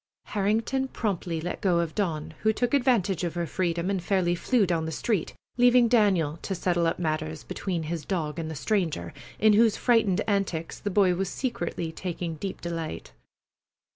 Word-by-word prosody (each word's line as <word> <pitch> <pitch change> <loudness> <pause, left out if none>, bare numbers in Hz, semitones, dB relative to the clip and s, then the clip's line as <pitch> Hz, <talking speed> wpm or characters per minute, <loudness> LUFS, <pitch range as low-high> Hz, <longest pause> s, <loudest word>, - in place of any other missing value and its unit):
Harrington 225 +6 0
promptly 185 -9 -2
let 175 +3 -4
go 180 -3 +3
of 170 -2 -1
Dawn, 160 -6 -2
who 220 - +4
took 240 +3 -1
advantage 230 - +2
of 170 -1 -2
her 170 0 -1
freedom 170 0 -1
and 190 -2 -1
fairly 180 -2 +1
flew 215 +5 +2
down 170 -3 0
the 160 - -3
street, 200 +3 -1 0.2
leaving 245 0 +6
Daniel 195 -10 +3
to 195 - -3
settle 175 -1 +1
up 165 - 0
matters 155 -2 -2
between 175 -4 -3
his 160 0 -4
dog 160 -2 -2
and 160 -1 -3
the 160 - -5
stranger, 160 - -1 0.2
in 215 0 +5
whose 220 0 +4
frightened 225 -7 +3
antics 195 -6 -1
the 205 - -3
boy 190 -2 +4
was 190 +1 -1
secretly 235 -11 -3
taking 175 -1 -4
deep 195 +3 -5
delight. 165 - -5
180 Hz, 175 wpm, -27 LUFS, 165-210 Hz, 0.2 s, leaving